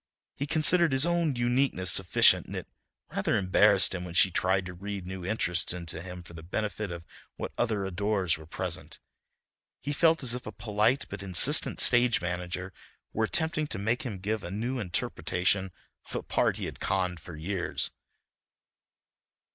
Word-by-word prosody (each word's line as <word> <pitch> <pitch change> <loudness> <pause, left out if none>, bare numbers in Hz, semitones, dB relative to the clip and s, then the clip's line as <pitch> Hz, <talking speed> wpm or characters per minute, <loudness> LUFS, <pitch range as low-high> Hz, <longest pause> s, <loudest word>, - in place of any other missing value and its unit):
He 140 - -4
considered 160 +1 +3
his 135 +3 +2
own 170 -4 +1
uniqueness 120 -6 +2
sufficient, 95 -1 +4
and - - -7
it - - -6 0.4
rather - - 0
embarrassed 95 0 +4
him 90 -1 -4
when 90 -1 -8
she 95 0 +5
tried 95 +1 +1
to 90 - -7
read 100 +1 -6
new 95 0 -7
interests 90 -4 +1
into 85 -3 -5
him 90 0 -8
for 85 - -12
the 80 - -9
benefit 105 +4 -3
of 85 -1 -7 0.3
what - - -5
other 110 -5 -1
adorers 95 -2 0
were 80 0 -12
present. 85 -2 -5 0.8
He 145 - -4
felt 165 0 +3
as 120 -2 +2
if 125 - -6
a - - -5
polite 110 +4 0
but 100 0 -6
insistent 95 -3 +3
stage 120 -2 +6
manager 90 +1 -4 0.4
were 110 - +1
attempting 160 - 0
to - - -4
make 110 +5 0
him 115 -7 -5
give 105 +3 -3
a - - -6
new 120 +7 -3
interpretation 95 0 -1 0.4
of - - -7
a - - -3
part - - 0
he - - -4
had - - -7
conned 90 -2 -1
for 85 - -10
years. 85 +3 -2
95 Hz, 170 wpm, -28 LUFS, 90-120 Hz, 0.8 s, stage